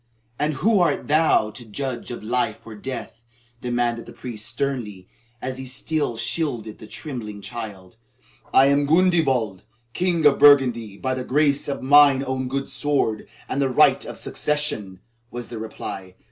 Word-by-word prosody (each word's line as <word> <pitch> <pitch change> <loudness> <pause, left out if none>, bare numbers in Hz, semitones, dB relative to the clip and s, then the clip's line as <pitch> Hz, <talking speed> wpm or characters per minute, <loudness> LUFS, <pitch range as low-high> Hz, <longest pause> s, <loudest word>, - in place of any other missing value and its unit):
"And 150 0 0
who 215 +8 +3
art 175 - +1
thou 150 -8 +3
to 120 - -10
judge 120 +2 -5
of 120 - -7
life 110 -1 -1
or 115 - -9
death?" 115 +1 -7 0.4
demanded 120 -1 -1
the - - -9
priest 115 -2 -5
sternly, 115 -7 -3 0.4
as 130 0 -4
he 130 - -6
still 135 0 -2
shielded 115 -2 -2
the - - -11
trembling 110 -6 -7
child. 105 -4 -8 0.5
"I 135 - +6
am 140 +1 +3
Gundebald, 145 - +2 0.3
King 175 -3 0
of 145 -1 +5
Burgundy 125 -8 +5
by 130 +3 -2
the 130 0 -3
grace 145 +2 +2
of 140 - -4
mine 140 0 +6
own 130 0 -2
good 135 +1 -3
sword 140 -7 -1 0.2
and 140 - -1
the 135 - +2
right 125 - +4
of - - -8
succession," 110 -11 -2 0.3
was 120 0 -7
the 115 - -6
reply. 95 -4 -7
130 Hz, 160 wpm, -23 LUFS, 110-145 Hz, 0.5 s, I